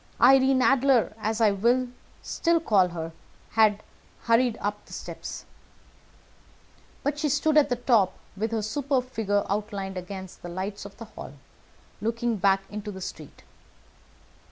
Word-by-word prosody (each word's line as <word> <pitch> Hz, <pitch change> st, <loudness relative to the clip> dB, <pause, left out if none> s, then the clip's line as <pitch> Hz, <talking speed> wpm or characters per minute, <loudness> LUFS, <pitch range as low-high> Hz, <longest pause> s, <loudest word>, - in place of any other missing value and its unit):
Irene 265 Hz, +1 st, +6 dB
Adler, 270 Hz, -4 st, +4 dB
as 220 Hz, +1 st, -1 dB
I 220 Hz, -2 st, +5 dB
will 240 Hz, +6 st, +2 dB, 0.4 s
still 335 Hz, -1 st, +1 dB
call 205 Hz, -, +3 dB
her, 165 Hz, -2 st, -5 dB, 0.4 s
had 215 Hz, -2 st, +3 dB, 0.4 s
hurried 230 Hz, 0 st, +3 dB
up 205 Hz, 0 st, -3 dB
the -, -, -12 dB
steps; -, -, -7 dB, 1.6 s
but 290 Hz, +1 st, -1 dB
she 300 Hz, -1 st, +1 dB
stood 310 Hz, +3 st, +2 dB
at 300 Hz, -2 st, +5 dB
the 245 Hz, -, +1 dB
top, 230 Hz, -6 st, +2 dB, 0.2 s
with 215 Hz, +3 st, -2 dB
her 220 Hz, -2 st, -1 dB
superb 255 Hz, +2 st, -1 dB
figure 205 Hz, -3 st, 0 dB
outlined 200 Hz, -2 st, -3 dB
against 190 Hz, 0 st, -8 dB
the 175 Hz, -, -7 dB
lights 190 Hz, +3 st, -5 dB
of 200 Hz, -, -11 dB
the 230 Hz, -, -8 dB
hall, 215 Hz, -9 st, -10 dB, 0.7 s
looking 230 Hz, +1 st, -1 dB
back 195 Hz, 0 st, +3 dB
into 210 Hz, 0 st, -6 dB
the 190 Hz, -, -8 dB
street. 160 Hz, -5 st, -9 dB
220 Hz, 145 wpm, -26 LUFS, 200-250 Hz, 1.6 s, Irene